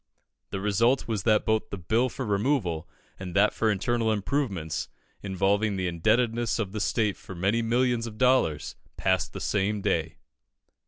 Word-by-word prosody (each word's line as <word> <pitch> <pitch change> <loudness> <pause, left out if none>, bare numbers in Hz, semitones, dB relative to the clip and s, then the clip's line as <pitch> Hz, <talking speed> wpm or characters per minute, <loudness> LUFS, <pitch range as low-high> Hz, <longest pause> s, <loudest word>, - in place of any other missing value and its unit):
The 95 - -4
result 115 +6 +2
was 110 -4 -1
that 105 -1 +3
both 110 0 +1
the 100 - -5
Bill 110 +8 +1
for 130 +2 -5
removal 100 - 0 0.3
and 90 -2 -7
that 105 +2 +4
for 110 - +1
internal 110 +3 +1
improvements, 100 - -2 0.3
involving 100 +2 +1
the 95 -1 -2
indebtedness 115 +7 +1
of 105 -5 -2
the 105 0 -4
state 105 -2 +1
for 95 - -10
many 100 +7 +1
millions 120 0 +1
of 110 -2 -9
dollars, 125 - +2 0.2
passed 95 -3 +1
the - - -7
same 105 +1 0
day. 80 -4 -1
105 Hz, 160 wpm, -27 LUFS, 95-115 Hz, 0.3 s, that